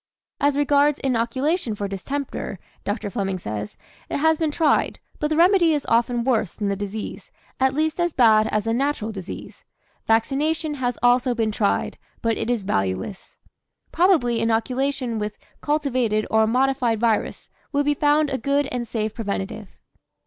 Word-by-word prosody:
"As 285 0 +2
regards 290 0 +3
inoculation 260 - 0
for 205 -1 -3
distemper," 205 +2 -4 0.3
Dr. 205 0 -3
Fleming 195 -4 -2
says, 105 - -5 0.3
"it - - -1
has 320 +2 +3
been 320 -2 +1
tried, 300 0 +1 0.2
but 300 - +1
the 310 - -1
remedy 345 -1 +5
is 290 - -3
often 235 +1 +2
worse 225 -7 0
than 205 -2 -2
the 200 - 0
disease, 205 +2 -6 0.3
at 265 0 +2
least 315 +2 0
as 345 0 +1
bad 220 -5 +5
as 215 -1 0
the 225 - 0
natural 260 -3 -1
disease. 195 -3 -8 0.4
Vaccination 295 +7 +1
has 250 -4 -2
also 245 0 +3
been 225 -2 0
tried, 205 -1 0 0.2
but 230 -1 +2
it 225 - -3
is 240 -4 0
valueless. 95 - -3 0.5
Probably 320 -10 +3
inoculation 245 +1 0
with 210 0 -4 0.2
cultivated 255 -8 0
or 220 0 +4
modified 250 -1 +1
virus 225 -2 -1 0.2
would 285 0 +1
be 295 - +3
found 295 0 +2
a 265 - -1
good 280 +4 +1
and 245 -1 -3
safe 215 -1 -2
preventative." 200 -2 -4
245 Hz, 155 wpm, -23 LUFS, 215-290 Hz, 0.5 s, remedy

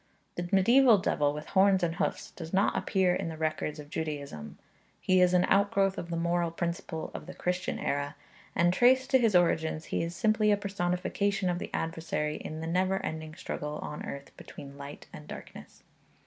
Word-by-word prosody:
The 175 0 -4
medieval 235 +4 +6
devil 145 -6 +1
with 150 +1 -7
horns 190 -1 +4
and 165 0 0
hoofs - - -2
does 165 -2 -8
not 195 +1 +2
appear 190 -3 +2
in 165 - -2
the 160 - -7
records 155 -1 -2
of 150 0 -10
Judaism. 140 - -5 0.4
He 185 -1 +3
is 180 0 +4
an 180 0 +4
outgrowth 195 -1 +2
of 170 - -6
the 170 - -2
moral 170 0 +1
principle 170 -1 -4
of - - -7
the - - -8
Christian 180 +1 -2
era; 145 0 -2 0.4
and 175 0 +3
traced 260 +6 +4
to 260 - +6
his 225 -5 +3
origins 160 -2 +2
he - - +1
is 170 +1 -3
simply 215 +1 +3
a 205 - +4
personification 195 0 -1
of 175 - -2
the - - -5
adversary 160 -2 -2
in 155 0 -6
the - - -4
never 185 +3 +1
ending 155 0 -5
struggle 150 -4 -5
on 150 - -6
earth 140 0 -8
between 140 0 -11
light 140 +1 -9
and 150 - -10
darkness. - - -11
175 Hz, 190 wpm, -29 LUFS, 155-195 Hz, 0.4 s, medieval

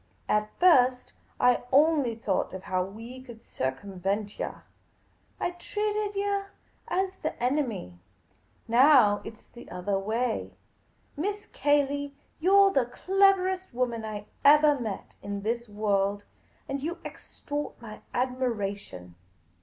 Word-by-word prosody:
At 210 0 +1
first, 255 -8 +4 0.3
I 250 0 +4
only 285 -4 +4
thought 205 -4 -1
of 190 - -8
how 185 -2 0
we 225 +7 -9
could 240 -3 -12
circumvent 195 +9 -3
yah. - - -4 0.8
I - - -1
treated 415 +3 -2
yah 400 0 0 0.4
as 375 +2 0
the - - -2
enemy. 240 - -1 0.7
Now, 240 -4 +6
it 220 - -9
's - - -27
all - - -35
the 240 - -12
othah 195 +2 -2
way. 225 +4 -2 0.6
Miss 410 +7 -3
Cayley, 285 -1 +1 0.2
you 360 +5 +2
're 395 0 +7
the 255 -3 +2
cleverest 375 +2 +2
woman 240 -3 -1
I 210 -1 -5 0.2
evali 295 -1 +6
met 215 -4 -6
in 200 0 -5
this 235 +1 -2
world; 205 -1 0 0.4
you 280 +6 -3
extort 290 0 -6
my 220 -3 -10
admira 245 -5 -1
tion 90 - -12
245 Hz, 130 wpm, -28 LUFS, 205-300 Hz, 0.8 s, re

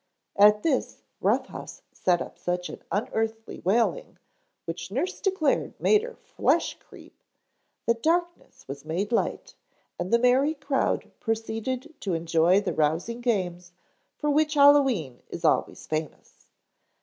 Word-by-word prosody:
At 210 +1 +6
this 295 -5 -1 0.2
Rough - - +2
House - - -10
set 175 -2 +1
up - - -13
such 180 0 -2
an - - -9
unearthly 225 +1 -2
wailing, 235 - 0 0.5
which 170 +1 -5
nurse 270 - -3
declared 375 -8 0
made 425 -1 +4
her 480 +1 -8
flesh - - 0
creep, - - -17 0.6
that 235 0 +1
darkness 345 +3 -1
was 140 +1 -7
made 175 +7 -2
light 230 - -1 0.5
and 175 +1 -3
the 235 - +6
merry 255 +6 +3
crowd 280 -1 -1
proceeded 225 +6 -3
to 190 -4 -2
enjoy 165 +3 +3
the 200 - -2
rousing 165 +10 0
games 180 -7 -2 0.4
for 295 -1 0
which 300 +1 +2
Hallowe'en 270 - +4
is - - -5
always - - +1
famous. 155 0 -6
225 Hz, 135 wpm, -26 LUFS, 180-280 Hz, 0.6 s, At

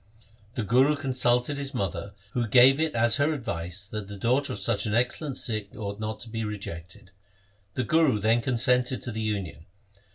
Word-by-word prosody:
The 115 - -1
Guru 130 +8 +4
con 140 -2 -4
sulted 125 +2 +2
his 140 -1 -3
mother, 100 -1 -3 0.2
who 120 -2 -1
gave 130 +4 +6
it 160 -4 0
as 115 0 +4
her 145 +2 +2
advice 90 - -3
that 105 -1 -6
the 100 0 -8
daughter 125 +7 +1
of - - -4
such 100 +2 +1
an 105 - 0
excellent 125 +4 0
Sikh 110 -3 -2
ought 100 -2 -5
not 110 0 -4
to 120 - -6
be 115 0 -3
rejected. 100 -1 -7 0.6
The 130 - 0
Guru 155 -2 +3
then 110 +3 +2
consented 125 +1 +1
to 120 - -4
the 110 +1 -4
union. 100 -7 -4
115 Hz, 190 wpm, -26 LUFS, 105-130 Hz, 0.6 s, gave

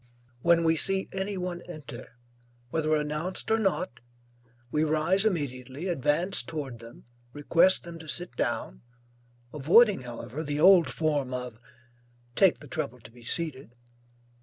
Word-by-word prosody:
When 170 +2 +4
we 160 0 +3
see 195 +4 +1
any 195 +1 -3
one 180 -1 -4
enter, 130 -7 -9 0.6
whether 155 -1 +1
announced 150 +7 -3
or 225 - +3
not, 185 - -1 0.7
we 150 - +1
rise 160 +6 +2
immediately, 145 - -2
advance 170 +3 +1
toward 145 -8 -6
them, 115 +1 -13 0.3
request 165 +6 +3
them 170 -1 -9
to 160 - -11
sit 175 +3 -3
down, 60 - -2 0.7
avoiding 175 - +5
however 125 +4 -6
the 145 -1 -2
old 180 -4 +7
form 135 0 -1
of, 125 -3 -6 0.8
'Take 190 -3 +4
the 145 - -11
trouble 125 -1 -4
to 115 - -14
be 120 +1 -17
seated.' 135 -1 -3
155 Hz, 135 wpm, -28 LUFS, 130-175 Hz, 0.8 s, old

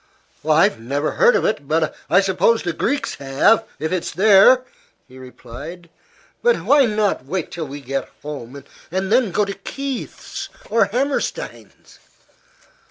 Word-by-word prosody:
"I've - - +4
never 140 +6 -2
heard 485 0 +4
of - - +1
it; 145 -10 -1
but 155 +1 0 0.2
I 195 - +5
suppose 195 +4 +2
the 175 - -2
Greeks 280 - -1
have, 140 +12 +3
if 160 - -3
it's 180 -2 -2
there," 215 +6 +5 0.4
he 130 0 -14
replied. 140 +7 -10 0.5
"But 485 0 +2
why 285 -3 +5
not 210 - 0
wait 180 +7 -3
till 165 -3 -5
we 140 +1 -8
get 135 +1 -4
home, 140 -2 -8 0.3
and 190 +3 -2
then 240 -2 +3
go 205 +4 +1
to 200 - -4
Kieth's 270 +7 -6 0.2
or 230 -2 +4
Hammerstein's?" 275 - -4
185 Hz, 145 wpm, -20 LUFS, 145-225 Hz, 0.5 s, I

